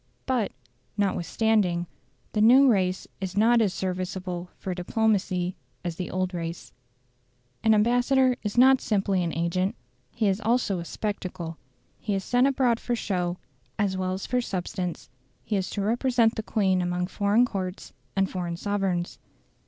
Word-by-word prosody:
But, 250 -6 0 0.5
notwithstanding, 195 -2 +1 0.5
the 210 - +1
new 255 +5 +7
race 185 -6 +1
is 190 0 -4
not 230 +2 +5
as 205 -4 +2
serviceable 185 -1 -4
for 185 - -4
diplomacy 185 -1 0 0.3
as 170 -2 -3
the 180 - -4
old 185 0 -1
race. 165 -1 -5 0.9
An 220 -1 +5
ambassador 245 +4 +3
is 210 +1 -4
not 260 +1 +6
simply 195 -4 +1
an 170 - -1
agent; 170 +4 0 0.3
he 220 -2 0
is 195 +2 +1
also 225 -4 +1
a 170 - -6
spectacle. 180 -5 -4 0.4
He 205 -2 -2
is 195 - -2
sent 245 +5 +3
abroad 255 -4 +2
for 240 - -1
show 180 -5 -2 0.4
as 200 -3 +1
well 185 0 -1
as 190 - -4
for 250 0 0
substance; 185 -4 -4 0.4
he 210 - -2
is 190 -2 -1
to 200 - -3
represent 235 +1 +2
the 220 - -3
Queen 190 -4 +1
among 180 0 -1
foreign 205 +5 +2
courts 190 -5 -5 0.2
and 195 0 +2
foreign 175 -3 -4
sovereigns. 190 -3 -1
195 Hz, 150 wpm, -26 LUFS, 180-225 Hz, 0.9 s, new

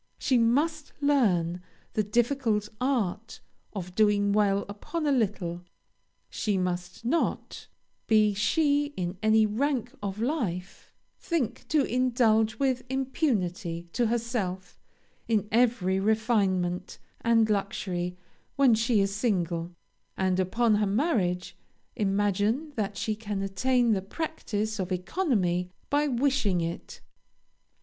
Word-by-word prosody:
She 255 -4 +2
must 290 +7 +1
learn 190 - +2 0.3
the 215 - +2
difficult 225 -1 0
art 230 -5 -1 0.3
of 180 -3 -6
doing 205 0 +3
well 200 -1 +2
upon 260 +11 -4
a 290 - +2
little. 195 -8 -1 0.7
She 210 -4 -1
must 180 +3 -3
not, 325 +8 -1 0.4
be 215 -2 +4
she 290 +7 +2
in 180 0 -3
any 220 0 +4
rank 245 +3 -1
of 200 0 -4
life, 220 - -3 0.3
think 260 - -2
to 300 -2 +3
indulge 230 -3 +2
with 260 -3 +1
impunity 195 - -1
to 240 - +1
herself 215 -6 -3 0.5
in 210 -3 +1
every 220 -5 +2
refinement 195 -4 0 0.3
and 230 -1 +4
luxury 185 -3 -2 0.4
when 270 -4 +5
she 225 -1 +2
is 195 0 0
single; 175 -7 -1 0.5
and, 185 -1 +1
upon 220 +5 +2
her 210 -1 +1
marriage, 195 - 0 0.4
imagine 205 +7 0
that 200 -2 -2
she 220 - -1
can 210 -2 -4
attain 240 +5 +2
the 200 -3 +1
practice 220 - -3
of 185 0 -3
economy 180 - 0 0.2
by 295 +1 +3
wishing 255 -7 +1
it. 170 0 -5
215 Hz, 115 wpm, -28 LUFS, 190-250 Hz, 0.7 s, when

